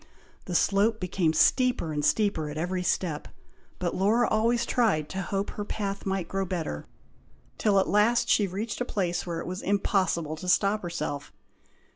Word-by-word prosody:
The 180 - -4
slope 205 +5 +3
became 180 -3 0
steeper 245 - +2
and 150 0 -2
steeper 160 -2 +1
at 150 - -6
every 180 +3 -1
step; 175 -4 -1 0.5
but 175 -2 -2
Laura 220 +5 +3
always 235 +2 +2
tried 210 - +1
to 190 - -3
hope 195 +2 -2
her 205 - -5
path 200 -1 -4
might 190 -3 -1
grow 195 0 -1
better, 170 - -4 0.7
till 205 -2 +3
at 190 - +1
last 235 +3 +3
she 205 -4 +3
reached 205 +6 -4
a - - +3
place 180 -6 -2
where 170 -1 -3
it - - -7
was 185 +1 -5
impossible 190 -5 0
to 180 +3 -5
stop 200 +3 +3
herself. 170 -5 -4
195 Hz, 170 wpm, -27 LUFS, 170-210 Hz, 0.7 s, slope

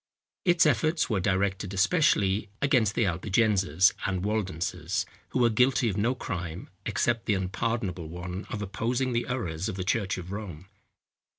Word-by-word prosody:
Its 175 -2 +5
efforts 155 -4 +2
were 105 - +2
directed 95 +1 0
especially 105 - +2
against 125 -7 +2
the 115 - +2
Albigenses 95 -1 +2
and 95 -1 -1
Waldenses, 95 -5 -1 0.2
who - - -2
were 120 -2 +4
guilty 125 +1 +3
of 100 - -2
no 120 +5 +1
crime, 90 -8 -5 0.2
except 115 -2 0
the 105 - +3
unpardonable 95 -2 -2
one 90 +3 -6
of 105 -2 -4
opposing 120 +6 -1
the 120 0 0
errors 95 -9 -2
of - - -4
the 95 - -3
church 100 0 0
of 90 0 -7
Rome. 95 -5 -6
100 Hz, 155 wpm, -28 LUFS, 95-120 Hz, 0.2 s, Its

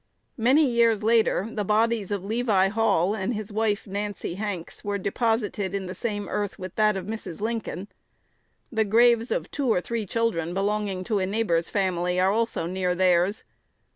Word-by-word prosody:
Many 265 +7 +5
years 230 -3 +3
later 225 -3 +3
the 210 - -2
bodies 215 0 +1
of 200 -3 -2
Levi 210 -3 +2
Hall 205 -3 +2
and 220 +3 -2
his 210 0 -5
wife, 210 -1 0
Nancy 200 -2 -4
Hanks, 190 -3 -5
were 205 0 -1
deposited 205 -1 -1
in 195 -1 -3
the 185 - -5
same 205 0 -3
earth 205 +2 -3
with 185 -1 -7
that 215 -2 +2
of 185 - -5
Mrs. 215 -5 -6
Lincoln. 215 -3 -3 0.8
The 220 -2 +2
graves 230 +2 +4
of - - -2
two 275 -5 0
or 180 - +3
three 225 +2 -4
children 180 -7 -1
belonging 200 -1 -1
to 205 +2 0
a 185 - 0
neighbor's 190 -5 0
family 180 -2 0
are 190 +1 +3
also 225 -5 0
near 180 0 -1
theirs. 180 +2 +2
205 Hz, 170 wpm, -25 LUFS, 185-225 Hz, 0.8 s, Many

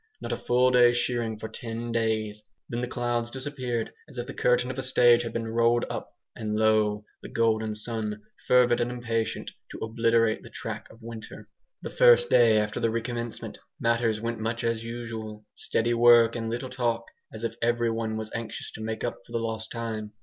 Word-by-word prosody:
Not - - -5
a - - +1
full 125 +1 +3
day's 120 -1 +6
shearing 120 -3 -1
for 110 - -6
ten 115 +1 -5
days. 110 -2 -1 0.3
Then 120 +1 -3
the 125 - -2
clouds 120 -1 -1
disappeared 130 -3 -3 0.2
as 135 - -13
if 120 - -3
the 140 - -7
curtain 125 +1 +2
of 130 - -6
a - - 0
stage 120 -2 +5
had 115 -1 -4
been 115 0 -3
rolled 115 +1 +2
up, - - -6 0.2
and 105 -1 -3
lo! 110 -1 +3 0.2
the - - -9
golden 110 -1 +1
sun, 105 -1 -3 0.2
fervid 125 -1 +5
and 120 - 0
impatient 115 -2 -2 0.2
to - - -8
obliterate 115 0 +2
the - - -12
track - - -6
of 115 +1 -17
winter. 115 -1 -9 0.4
The - - -5
first 485 -1 +5
day 115 -2 +6
after 105 0 0
the 115 - +2
recommencement, 115 +1 -4 0.2
matters 115 -2 +1
went 115 +1 -3
much 115 +1 -2
as 115 -1 0
usual. 115 -2 -6
Steady 115 +1 0
work 120 -1 +6
and 115 -1 -3
little 120 +3 -3
talk, 120 -2 0 0.3
as 110 +1 -9
if 115 -1 -1
everyone 115 -2 0
was 110 0 -5
anxious 115 -1 -5
to - - -9
make 110 0 -4
up 120 - -2
for 120 - -15
the - - +1
lost 110 -1 -3
time. 110 -2 -4
115 Hz, 195 wpm, -27 LUFS, 110-120 Hz, 0.4 s, day's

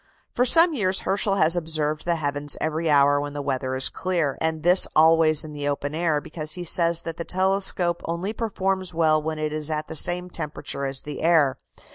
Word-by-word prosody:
For 250 - +1
some 330 +6 +6
years 190 -8 0
Herschel 195 +1 -1
has 165 -3 +3
observed 155 -2 -1
the 170 0 0
heavens 145 -2 -2
every 160 +1 -2
hour 145 0 +3
when 145 0 -6
the 145 - -5
weather 130 -1 -3
is 130 - +1
clear, 170 -7 -2
and 160 -1 -2
this 180 +2 +6
always 160 0 +4
in 155 - -10
the 145 -1 -4
open 145 0 -4
air, 160 -2 0
because 155 0 -4
he 180 - -4
says 170 -1 +3
that 165 0 -6
the 170 - -5
telescope 185 -2 -1
only 170 +5 -4
performs 190 -5 -3
well 155 -2 +2
when 155 0 -5
it 155 0 -4
is 155 0 -3
at 155 -1 -4
the 160 - -7
same 180 +3 +2
temperature 140 -3 -5
as 135 0 -2
the 150 -1 -7
air. 150 -5 +2
160 Hz, 205 wpm, -23 LUFS, 150-180 Hz, -, some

